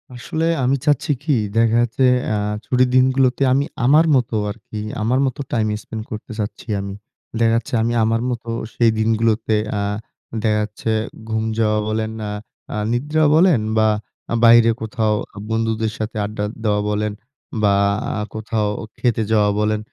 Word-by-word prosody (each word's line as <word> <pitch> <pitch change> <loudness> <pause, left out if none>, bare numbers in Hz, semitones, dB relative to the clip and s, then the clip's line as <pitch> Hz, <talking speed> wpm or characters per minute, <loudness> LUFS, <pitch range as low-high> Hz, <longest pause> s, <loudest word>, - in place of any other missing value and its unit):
আসলে 160 +6 -3 0.2
আমি 130 +2 +3
চাচ্ছি 145 0 +2
কী? 150 - 0 0.3
দেখা 115 0 +3
যাচ্ছে 120 +2 +1 0.3
আ - - +1 0.3
ছুটির 125 0 +2
দিনগুলোতে 130 0 +3
আমি 140 +2 +2 0.2
আমার 150 +5 +6
মতো 120 -3 0
আরকি 105 0 -8 0.2
আমার 120 +4 +1
মতো 130 0 -3
টাইম 110 -2 +1
স্পেন্ড 110 -1 -7
করতে 110 +2 -7
চাচ্ছি 105 +3 -5
আমি। 100 0 -5 0.5
দেখা 115 -1 +4
যাচ্ছে 115 +1 -3
আমি 120 +1 0
আমার 115 +1 +1
মতো 120 -1 -4 0.3
সেই 115 -1 +4
দিনগুলোতে 110 0 +1 0.2
আ - - 0 0.6
দেখা 105 -1 +2
যাচ্ছে 105 +2 -5 0.4
ঘুম 110 0 0 0.2
যাওয়া 110 -1 +2
বলেন, 110 0 -1
অ্যা 105 - -3 0.4
আ - - -3 0.2
নিদ্রা 150 +6 +1
বলেন 165 -5 +5 0.2
বা 110 0 +4 0.4
আ - - 0
বাইরে 115 0 +7
কোথাও 110 -1 0 0.2
আ - - -12
বন্ধুদের 110 -1 0
সাথে 110 +1 -4
আড্ডা 105 0 -4 0.2
দেওয়া 105 -2 +1
বলেন 105 0 -1 0.5
বা 100 -1 +4 0.6
কোথাও 110 -1 -1 0.3
খেতে 120 -3 +1
যাওয়া 105 -2 +4
বলেন। 105 0 +1
115 Hz, 155 wpm, -20 LUFS, 110-125 Hz, 0.6 s, বাইরে